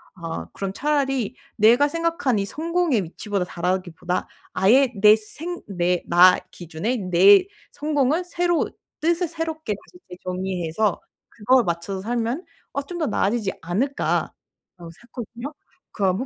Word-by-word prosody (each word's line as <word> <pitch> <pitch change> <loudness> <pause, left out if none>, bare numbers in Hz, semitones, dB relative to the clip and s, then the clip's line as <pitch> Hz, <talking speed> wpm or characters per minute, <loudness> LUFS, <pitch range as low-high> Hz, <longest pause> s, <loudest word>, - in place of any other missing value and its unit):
'아 165 -2 -6
그럼 195 -1 -4
차라리 270 -4 0 0.2
내가 235 +7 +5
생각한 330 - 0
이 200 - -1
성공의 325 - 0
위치보다 190 +2 -3
잘하기보다 180 0 -2 0.3
아예 250 +7 +4
내 210 +1 +8
생 315 +11 -7
내 180 -2 0
나 180 +2 +7
기준의 175 +8 -3
내 195 - +7 0.3
성공을 295 +2 0
새로 345 -1 0 0.3
뜻을 340 +2 +1
새롭게 320 -7 -4
다시 355 - -18
이제 180 - -9
정리해서 185 +1 -1 0.3
그거에 250 +3 +3
맞춰서 175 +1 -3
살면 240 - -2 0.3
어 280 - -1
좀 350 +4 -7
더 320 - 0
나아지지 210 -1 0
않을까.'라고 215 +12 -1 0.6
생각했거든요. 235 - -9 0.4
그러고 195 +4 +1
225 Hz, 300 characters per minute, -23 LUFS, 185-295 Hz, 0.6 s, 내